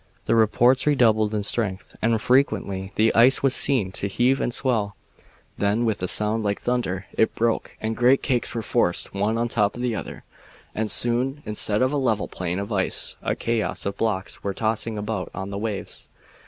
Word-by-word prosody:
The - - +1
reports 120 +4 +3
redoubled 110 -6 +3
in 105 - -1
strength, 100 -3 -2
and 115 0 +1
frequently 100 -7 0
the 110 +1 +3
ice 125 +5 +4
was 135 -2 +4
seen 125 -11 +2
to 100 - -3
heave 125 +7 +1
and - - -1
swell. 115 -6 0 0.6
Then, 105 +4 +1
with 110 -4 -1
a 90 - -1
sound 105 +4 +4
like 100 -1 -2
thunder, 115 -7 -2
it 110 - +1
broke 115 0 -1
and 110 +1 -3
great 125 +3 +3
cakes 125 -4 0
were 115 - -3
forced - - 0
one 105 +3 0
on 120 +1 0
the - - -5
top 105 0 +1
of 120 - -5
another, 115 -4 -4 0.5
and 110 0 -2
soon, 125 +6 0
instead 105 +1 0
of 130 - +1
a 145 - -1
level 115 -6 0
plain 90 -1 -4
of 100 +3 -5
ice, 95 -3 +1
a - - -1
chaos 115 -2 -2
of 100 0 -2
blocks 100 -3 -3
were 100 -1 -3
tossing 110 0 -2
about 105 -3 -4
on 95 +2 -5
the 100 - -4
waves. 105 -2 -5
110 Hz, 195 wpm, -23 LUFS, 100-120 Hz, 0.6 s, ice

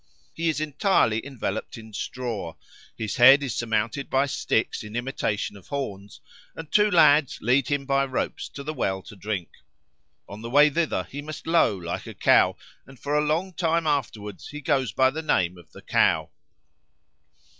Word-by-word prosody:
He 165 0 -1
is 155 - -1
entirely 155 - +1
enveloped 120 -5 -5
in 110 -1 -12
straw; 115 -7 -4 0.4
his 110 -3 -3
head 135 +4 +8
is 130 -5 -2
surmounted 115 +4 -2
by 135 +1 +2
sticks 115 -6 -1
in 105 +1 -9
imitation 120 -5 -2
of 100 - -15
horns, 100 -8 -6 0.3
and 160 -2 -9
two 210 0 +4
lads 150 -6 +5
lead 125 +3 +2
him 145 -1 -1
by 135 0 +2
ropes 130 -1 -3
to 140 - -9
the 155 +2 -4
well 95 -9 -2
to 105 - -12
drink. 100 -3 -4 0.8
On 100 +2 -9
the 115 - -6
way 145 +4 +6
thither 165 +2 0
he 145 - -8
must 155 +1 -8
low 165 - +3
like 85 -1 -5
a - - -8
cow, - - +4 0.3
and 135 -2 -15
for 145 - -3
a 150 - +3
long 165 +5 -1
time 165 -1 0
afterwards 110 - -3
he 150 - -8
goes 135 -5 0
by 130 +4 +3
the 160 +3 -4
name 95 - +1
of 85 -4 -17
the - - -14
Cow. - - +2
135 Hz, 175 wpm, -25 LUFS, 105-150 Hz, 0.8 s, head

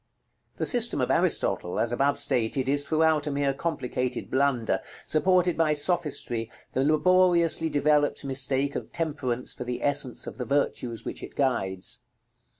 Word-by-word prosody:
The - - -1
system 240 - +3
of 125 - 0
Aristotle, 90 - 0
as 115 - +2
above 140 +4 +1
stated, 125 +2 +1
is 145 +1 +2
throughout 155 0 +1
a - - -1
mere 140 -1 0
complicated 130 -5 -3
blunder, 130 -4 +1 0.2
supported 180 +2 +3
by 160 -2 +2
sophistry, 145 -8 -2 0.2
the 130 - +1
laboriously 170 +1 +3
developed 145 0 +1
mistake 135 +1 +1
of - - -5
Temperance 145 -7 -2
for - - -6
the 125 0 -5
essence 140 -3 0
of - - -9
the 125 - -3
virtues 125 -4 -2
which - - -6
it - - -10
guides. 95 -9 -1
140 Hz, 150 wpm, -26 LUFS, 125-155 Hz, 0.2 s, system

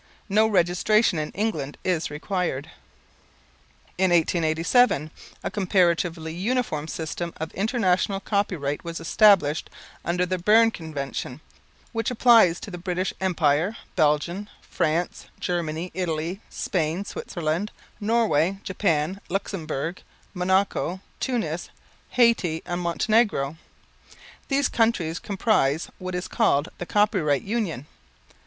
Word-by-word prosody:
No 215 +2 +4
registration 190 0 +3
in 150 - -2
England 160 -10 -2
is 175 -3 0
required. 160 -1 -3 1.3
In 190 -1 +4
1887, 165 - +2 0.3
a - - -2
comparatively 175 -4 +1
uniform 185 -5 -1
system 165 +1 -4
of 160 +1 -5
International 195 -2 +1
Copyright 180 -9 -1
was 170 -1 -5
established 175 -5 +4 0.3
under 180 +1 0
the 185 0 -2
Berne 225 +5 +5
Convention, 145 - -5 0.5
which 225 -2 -1
applies 230 -8 +5
to 205 - -7
the 175 - -6
British 180 +1 -2
Empire, 170 +1 +1 0.2
Belgium, 170 +5 +1
France, 165 +3 -2
Germany, 170 0 -2
Italy, 175 +1 -2
Spain, 170 +2 -1
Switzerland, 170 +3 -3 0.3
Norway, 205 -5 +2
Japan, 185 -1 0
Luxembourg, 170 -4 -3 0.3
Monaco, 190 0 +1 0.2
Tunis, 180 - -2 0.5
Hayti 225 -10 +3
and 175 0 -3
Montenegro. 170 -4 +1 0.9
These 280 0 +2
countries 225 -8 +1
comprise 185 - +1
what 185 0 -4
is 180 +1 -3
called, 170 -10 +2
"The 175 - -5
Copyright 190 - +2
Union." 195 - -2
180 Hz, 105 wpm, -25 LUFS, 160-205 Hz, 1.3 s, Berne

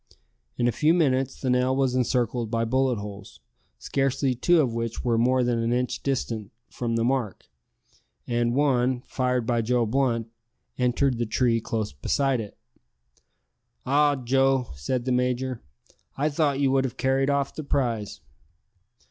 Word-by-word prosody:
In 120 - +1
a - - +3
few 155 +7 +2
minutes 135 -5 +1
the 130 - 0
nail 125 +1 +2
was 135 -2 +1
encircled 120 -2 0
by 115 0 0
bullet 130 +1 +1
holes, 100 -1 -9 0.4
scarcely 135 -1 0
two 170 +8 +3
of 130 -6 +1
which 115 -1 -3
were 120 -1 +2
more 125 +2 +3
than 120 -1 0
an 115 +1 0
inch 125 0 -1
distant 115 -6 -3 0.2
from 115 -2 -2
the 115 - +1
mark, 125 -4 -1 0.8
and 120 0 0
one 130 -3 +2
fired 125 -2 -1
by 120 0 +1
Joe 120 +1 +1
Blunt 115 -1 0 0.4
entered 125 0 +1
the 120 - -1
tree 115 0 +1
close 110 -2 -3
beside 130 - 0
it. 105 - -10 1.3
"Ah, 145 +2 +3
Joe!" 135 0 +1
said 120 - -3
the 130 - 0
major, 125 0 -1 0.6
"I 145 +3 +1
thought 145 -2 0
you 135 -2 +2
would 135 0 +3
have 130 -1 -4
carried 135 +1 +1
off 140 -1 0
the 155 - -6
prize." 120 -7 -2
125 Hz, 155 wpm, -25 LUFS, 115-135 Hz, 1.3 s, a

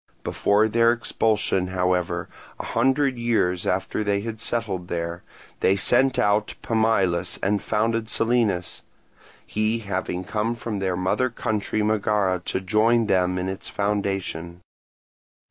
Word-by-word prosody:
Before 105 +2 +2
their 115 +1 +4
expulsion, 110 -5 0
however, 90 -1 0 0.3
a - - -5
hundred 130 +2 +1
years 100 -7 +1
after 95 +3 -1
they 100 -1 0
had 110 0 -6
settled 100 -7 -2
there, 85 0 -3 0.4
they 95 - +3
sent 130 +6 +3
out 105 +1 +1
Pamillus 100 -6 +1
and 100 +1 +1
founded 115 +1 0
Selinus; 115 -7 0 0.6
he 110 +2 0
having 95 -4 -3
come 110 +4 -1
from 115 -3 -4
their 95 -2 -1
mother 95 +8 +1
country 110 -2 -2
Megara 105 -3 +1
to 95 - -2
join 110 +4 +3
them 90 -2 +1
in 90 +1 -2
its 95 0 -4
foundation. 95 -4 -2
105 Hz, 130 wpm, -24 LUFS, 90-115 Hz, 0.6 s, their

